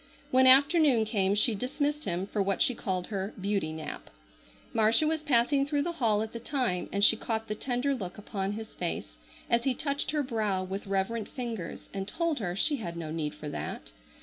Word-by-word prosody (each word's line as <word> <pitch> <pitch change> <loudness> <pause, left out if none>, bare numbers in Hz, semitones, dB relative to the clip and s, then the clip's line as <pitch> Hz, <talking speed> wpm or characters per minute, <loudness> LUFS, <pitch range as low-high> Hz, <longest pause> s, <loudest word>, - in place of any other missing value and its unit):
When 260 0 +6
afternoon 280 -2 +6
came 200 -2 +1
she 215 +2 +3
dismissed 285 +7 -2
him 180 +1 -1
for 205 +1 -2
what 195 -1 0
she 250 - +3
called 185 -5 -2
her 195 -1 -4
"beauty 195 -4 -1
nap." 155 - -7 0.6
Marcia 225 +5 +4
was 315 0 0
passing 275 -1 +3
through 285 0 0
the 345 - -2
hall 215 -2 +3
at 220 - -7
the 235 - -5
time 240 -8 -1
and 200 +1 +5
she 225 - +8
caught 225 0 -3
the 215 - -2
tender 250 +5 -1
look 190 -9 -5
upon 200 -1 -3
his 220 +1 -7
face - - -4 0.3
as 235 0 +2
he 265 -2 +1
touched 280 +1 -1
her 300 -1 +1
brow 215 -7 -1
with 195 +2 -5
reverent 195 +3 -1
fingers 235 - -5
and 195 -1 -4
told 330 +4 -1
her 180 -5 -3
she 290 +9 +2
had 170 -8 -6
no 160 -2 -5
need 155 -2 -3
for 150 - -8
that. - - -6
220 Hz, 205 wpm, -29 LUFS, 190-260 Hz, 0.6 s, she